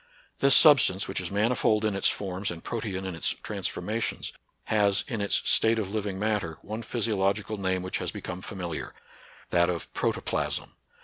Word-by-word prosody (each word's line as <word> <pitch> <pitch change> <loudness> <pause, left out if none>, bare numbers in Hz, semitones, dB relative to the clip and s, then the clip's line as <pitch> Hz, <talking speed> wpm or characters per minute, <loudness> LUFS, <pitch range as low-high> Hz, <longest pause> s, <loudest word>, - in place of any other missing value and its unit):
This 140 0 +6
substance, 130 - +6
which - - -2
is 90 - -4
manifold 110 +1 +2
in 105 -2 0
its 95 - +2
forms 95 0 -3
and 85 -1 -7
protean 100 -5 -3
in 95 - -3
its 80 - +1
trans - - -2
formations, 110 +2 -3 0.3
has, 100 -2 +2
in 115 -6 -3
its 100 - +1
state 115 +1 +4
of 100 -3 -2
living 100 -3 -2
matter, 105 -6 -1
one 110 +2 -5
physiological 105 -2 -1
name 95 -1 0
which 95 - -2
has - - -3
become 90 +1 -6
familiar, 90 -6 -5 0.6
that 85 0 +4
o? 90 - 0 0.2
protoplasm. - - -1
100 Hz, 170 wpm, -27 LUFS, 95-110 Hz, 0.6 s, This